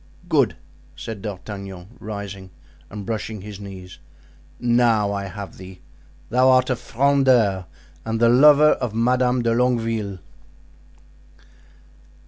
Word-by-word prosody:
"Good!" - - +2 0.4
said 110 -4 -7
D'Artagnan, 100 -2 -8
rising 100 -3 -7 0.4
and 105 -1 -8
brushing 110 -1 -4
his 105 0 -9
knees; 95 -2 -10 0.6
"now 120 -4 +2
I 100 0 -3
have 100 +1 -8
thee—thou 100 +6 -3
art 130 0 +4
a - - +1
Frondeur 125 -7 +2 0.4
and 110 0 -2
the 115 - +4
lover 150 +4 +6
of 115 -3 -2
Madame 125 +1 +2
de 115 - +1
Longueville." 115 -5 0
110 Hz, 110 wpm, -22 LUFS, 100-125 Hz, 0.6 s, lover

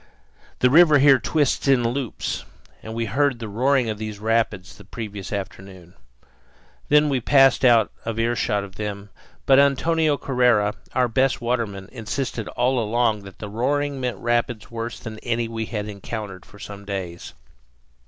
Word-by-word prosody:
The 125 - +4
river 155 -1 +7
here 135 -1 +6
twists 145 +3 0
in 125 -4 +4
loops, 125 -1 -3 0.4
and 110 0 -8
we 115 0 -1
had 100 - -7
heard 140 -2 +2
the 115 -1 -6
roaring 125 +4 +1
of 110 -1 -3
these 110 -1 -5
rapids 110 -3 -1
the - - -14
previous 105 -4 -7
afternoon. 95 -3 -7 1.0
Then 150 +1 +5
we 135 -3 0
passed 135 0 +4
out 120 -4 +5
of 115 -1 -4
earshot 115 -3 0
of 95 -1 -11
them; 100 -1 -5 0.3
but 135 0 +6
Antonio 150 +2 +2
Correa, 125 -7 +2 0.2
our 125 -1 +3
best 130 +2 +1
waterman, 115 -5 -2
insisted 115 0 -4
all 125 +1 0
along 110 -2 0
that 95 -2 -12
the 105 - -7
roaring 140 +6 -1
meant 125 -1 -2
rapids 120 -2 -1
worse 115 0 -5
than 110 -2 -8
any 120 -1 -1
we 115 -1 -4
had 105 -2 -4
encountered 100 -2 -7
for 105 - -16
some 100 0 -9
days. 95 -4 -6
115 Hz, 165 wpm, -23 LUFS, 105-130 Hz, 1.0 s, river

